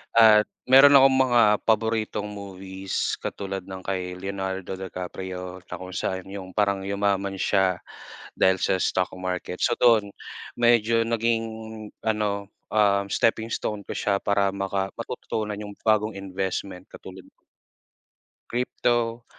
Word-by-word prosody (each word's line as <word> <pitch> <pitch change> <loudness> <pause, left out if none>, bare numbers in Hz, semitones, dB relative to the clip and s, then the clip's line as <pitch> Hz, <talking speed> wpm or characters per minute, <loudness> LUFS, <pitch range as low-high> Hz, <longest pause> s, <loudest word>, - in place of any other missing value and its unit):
at 110 -2 +7 0.2
meron 135 +2 +8
akong 135 -1 +7
mga 120 -2 +4 0.2
paboritong 110 -1 0
movies 95 -2 -4
katulad 95 -1 -4
ng 95 0 -8
kay 90 -2 -2
Leonardo 95 -1 -4
Di 95 0 -7
Caprio 90 0 -6
na - - -6
kung 95 0 -8
saan 95 -1 -3
yung 95 -2 -7
parang 100 -2 +1
yumaman 100 0 -1
siya 95 -3 +2 0.6
dahil 95 0 +3
sa - - +1
stock 90 0 0
market. 90 -1 -4
So 120 - +3
do'n, 110 -4 +4 0.5
medyo 115 -1 +4
naging 115 0 +1 0.6
ano, 105 -2 -1 0.2
ah, 100 -2 +3
steppingstone 110 -1 -1
ko - - -4
siya 100 -1 0
para 100 -1 +2
maka 95 0 -2
matututunan 105 -1 -4
yung 105 -1 -8
bagong 110 0 +2
investment 95 -1 -4
katulad - - -11 1.3
Crypto, 120 -1 0
100 Hz, 125 wpm, -25 LUFS, 95-110 Hz, 1.3 s, meron